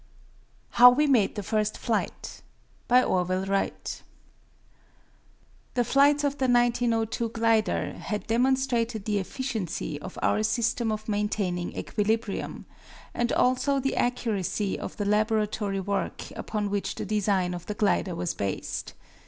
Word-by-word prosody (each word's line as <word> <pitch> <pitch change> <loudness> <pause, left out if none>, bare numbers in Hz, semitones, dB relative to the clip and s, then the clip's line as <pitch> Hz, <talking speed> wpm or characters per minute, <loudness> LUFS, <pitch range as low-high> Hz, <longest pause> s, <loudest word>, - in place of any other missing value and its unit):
How 245 +1 +9
We 280 +5 +3
Made 245 -9 +3
the 205 - -4
First 215 0 -1
Flight 225 -2 -3 0.5
By 250 +1 +5
Orville 185 +1 0
Wright 195 0 -2 1.7
The 245 - +3
flights 285 +4 +4
of 285 0 -1
the 260 - +2
1902 235 -1 +1
glider 225 -1 +1
had 210 -3 -4
demonstrated 240 -2 +1
the 210 -2 +1
efficiency 190 - -4
of 185 - -8
our - - +2
system 230 +1 0
of 215 0 -4
maintaining 205 -4 -1
equilibrium, 220 0 -2 0.5
and 240 0 0
also 265 +2 +2
the 270 +1 -1
accuracy 215 -5 -1
of - - -7
the 205 - -2
laboratory 210 -1 +1
work 200 +1 -3
upon 210 -2 -3
which 200 -1 -2
the - - -4
design 200 -4 +1
of 175 -1 -7
the 210 - -3
glider 200 -3 +1
was 170 0 -2
based. 100 -1 -4
215 Hz, 130 wpm, -27 LUFS, 200-240 Hz, 1.7 s, How